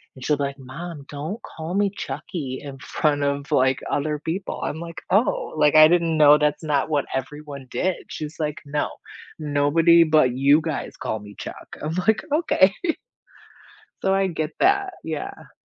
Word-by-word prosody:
and 130 - -9
she'll 150 -1 +2
be, 140 - -1
like, 140 0 -5
"Mom 145 +3 -8
don't 155 +10 -5 0.2
call 165 +3 -5
me 200 -1 +2
Chuckie 135 -7 -5
in 140 -1 -8
front 145 0 0
of, 140 +1 -2
like, 130 -1 +3
other 150 +1 0
people." 175 +5 -4
I'm, 160 - -3
like, 170 -1 -7
"Oh, 205 +6 +1
like, 150 0 +4
I 155 0 +10
didn't 170 -2 +2
know 150 0 +8
that's 150 +1 0
not 150 -1 0
what 145 -2 +1
everyone 140 0 -6
did." 185 -1 0
She's, 155 +1 -6
like, 150 -1 -2
"No, 145 +1 -1 0.5
nobody 155 +3 +4
but 155 -6 +3
you 140 +4 +5
guys 155 -2 -4
call 110 - -3
me 105 -1 -12
Chuck." - - -9
I'm, 155 +2 -2
like," 220 - +3
Okay." 200 - +4 1.3
So, 190 - +3
I 195 0 +2
get 160 -2 -3
that, 390 0 +2
yeah. 155 -2 -6
150 Hz, 170 wpm, -23 LUFS, 145-170 Hz, 1.3 s, I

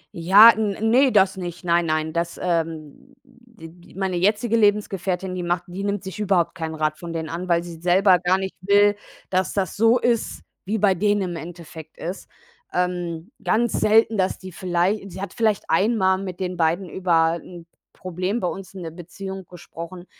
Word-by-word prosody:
Ja, 195 +7 +8
n 210 -3 -1
ne, 260 +2 +5
das 190 -2 +3
nicht, 175 0 -6
nein, 170 -1 +2
nein. 155 0 -1
Das, 170 0 -3
ähm, 165 - -3
d 225 -11 -16
meine 190 -2 -1
jetzige 210 +6 +1
Lebensgefährtin, 195 -4 0
die 180 - -4
macht 175 0 -1
die 185 +3 -7
nimmt 200 -1 -2
sich 190 +2 -8
überhaupt 190 -5 +1
keinen 160 -3 -5
Rat 155 -1 -1
von 170 -1 -7
denen 160 -1 -4
an, 175 +2 -5
weil 170 0 +2
sie 170 -2 -10
selber 180 +1 +4
gar 185 +2 +2
nicht 190 0 -5
will, 205 +1 +4 0.4
dass 185 0 0
das 190 -4 -2
so 225 +3 +4
ist, 235 -2 -1 0.2
wie 210 +4 -1
bei 200 -2 +3
denen 205 +2 +1
im - - -5
Endeffekt 165 -1 -10
ist. 180 +4 -6 0.4
Ähm, 180 +1 -3
ganz 235 +1 +1
selten, 220 +1 +3
dass 185 - 0
die 185 0 -10
vielleicht 185 +3 -1
sie 185 - -9
hat 200 - -6
vielleicht 215 -3 +1
einmal 190 0 +2
mit 185 -2 -6
den 180 -1 -3
beiden 170 +3 0
über 165 -2 +1
‘n 175 -2 -12 0.3
Problem 185 +5 -3
bei 180 - 0
uns 195 -1 -8
in 185 -2 -8
der 165 - -6
Beziehung 190 +3 -8
gesprochen. 175 0 -10
185 Hz, 185 wpm, -22 LUFS, 170-200 Hz, 0.4 s, Ja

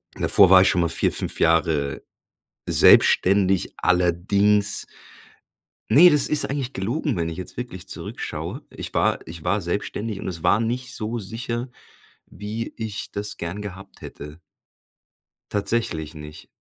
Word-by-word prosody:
Davor 95 -3 +4
war 95 -1 +8
ich - - +4
schon 90 - +1
mal 85 - 0
4, - - +2
5 - - +1
Jahre 80 -4 +1 0.7
selbstständig, 95 -2 +4
allerdings 100 +4 +1 1.0
ne, 175 +5 +7
das 150 -2 +5
ist 150 - +2
eigentlich 135 -1 -4
gelogen, 120 - -3
wenn 85 -1 -2
ich 80 - -6
jetzt 95 - -9
wirklich 95 -7 -8
zurückschaue. - - -6
Ich - - -7
war - - +1
ich 80 -1 -10
war 100 +1 0
selbstständig 100 +3 -4
und - - -6
es 85 -3 -6
war 110 - +3
nicht 125 +2 -3
so 115 +2 -4
sicher, 115 +4 -5 0.6
wie 110 +3 -7
ich 110 -1 -5
das 105 0 -4
gern 85 +4 -6
gehabt 95 -2 -11
hätte. 75 +3 -11 1.1
Tatsächlich 100 -7 -2
nicht. 75 +1 -11
100 Hz, 140 wpm, -22 LUFS, 85-115 Hz, 1.1 s, war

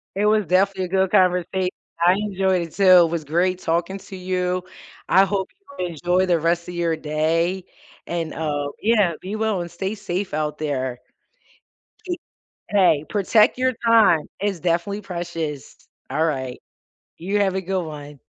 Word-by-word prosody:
It 205 - +1
was 210 -1 +3
definitely 190 +1 +2
a - - -5
good 190 0 +1
conversation. 180 -1 +2 0.4
I 180 - +6
enjoyed 190 -2 0
it, 165 -2 -7
too. 200 - -1 0.2
It 165 - -2
was 165 -2 -3
great 180 +4 +1
talking 170 +4 -1
to 195 0 -11
you. 180 0 -1 0.5
I 190 +2 +6
hope 195 0 -2 0.3
you 180 - -1
enjoy 175 +3 +1
the 175 -2 +2
rest 170 +2 0
of 180 - -6
your 170 -2 0
day 165 +4 0 0.4
and, 165 -2 -3
uh, 145 -2 -2
yeah, 210 -5 +3
be 195 +3 -5
well 220 -3 0
and 175 - -6
stay 190 +4 -4
safe 185 -1 -4
out 150 0 -2
there. 130 -5 -2 1.1
Eh 355 - 0 0.6
hey, 180 -7 +3
protect 210 +3 +3
your 255 0 +2
time, 215 -9 +5
it's 200 -2 -1
definitely 175 +4 -1
precious. 165 -6 -5 0.3
All 155 +4 +1
right, 130 -5 -2 0.6
you 195 +5 -1
have 195 -2 +2
a 190 - 0
good 190 0 -2
one. 150 -2 -9
180 Hz, 165 wpm, -22 LUFS, 165-195 Hz, 1.1 s, I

